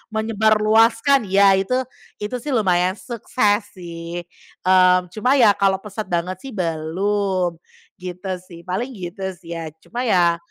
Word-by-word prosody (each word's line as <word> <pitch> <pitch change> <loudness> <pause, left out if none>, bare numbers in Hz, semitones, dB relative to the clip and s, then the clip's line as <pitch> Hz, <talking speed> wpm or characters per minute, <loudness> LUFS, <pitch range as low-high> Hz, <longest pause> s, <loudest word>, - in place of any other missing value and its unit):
menyebarluaskan 220 +3 +3
ya, 195 0 +5
itu 195 +6 -1 0.5
itu 250 +4 -3
sih 270 +2 -3
lumayan 185 -3 +2
sukses 205 +1 -1
sih. 170 -1 -7 0.4
Mmm, 185 -1 +4
cuma 250 +7 +1
ya 230 -6 +6
kalau 195 -1 +2
pesat 210 +1 -6
banget 175 +1 -2
sih 270 - -9
belum, 180 +1 -1 0.4
gitu 180 +1 -6 0.2
sih, 170 -2 -12
paling 220 +9 -3
gitu 190 +2 -5
sih 170 -1 -9
ya, 160 -1 -5
cuma 240 - -5
ya 175 -8 +3
190 Hz, 135 wpm, -21 LUFS, 180-220 Hz, 0.5 s, ya